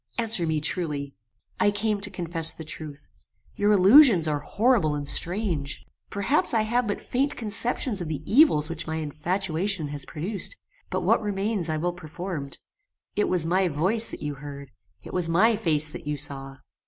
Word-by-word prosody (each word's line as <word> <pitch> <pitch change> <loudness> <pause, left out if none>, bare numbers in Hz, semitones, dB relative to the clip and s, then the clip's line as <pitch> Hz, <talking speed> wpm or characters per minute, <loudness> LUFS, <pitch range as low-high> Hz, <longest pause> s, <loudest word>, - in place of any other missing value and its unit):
Answer 225 -7 +3
me 160 -1 0
truly." 150 -3 -2 0.5
"I - - +4
came 205 0 -1
to 205 - +2
confess 170 -3 -3
the 160 - -8
truth. 150 -2 -8 0.5
Your 205 +1 +2
allusions 205 - +7
are 150 -1 0
horrible 200 - +1
and 145 -1 -4
strange. 175 -7 -1 0.2
Perhaps 235 +6 +3
I 220 - +3
have 235 +2 0
but 205 - -2
faint 275 +3 -1
conceptions 225 -1 -1
of 170 - -4
the 155 -2 -4
evils 220 - +4
which 165 0 -5
my 160 - -3
infatuation 165 +2 -2
has 145 -2 -5
produced; 195 - -4 0.3
but - - -2
what - - +3
remains 200 -3 -2
I 155 - -1
will 175 +3 -1
perform. 170 -3 -6 0.7
It 210 - +1
was 175 -3 +1
my 185 +3 +2
VOICE 185 +9 +1
that - - -5
you 150 0 -3
heard! 140 -1 -10 0.3
It - - -10
was 180 -2 +1
my 215 +7 +4
FACE 155 -7 0
that 155 0 -9
you 150 0 -2
saw!" 135 -1 -4
175 Hz, 175 wpm, -25 LUFS, 150-210 Hz, 0.7 s, allusions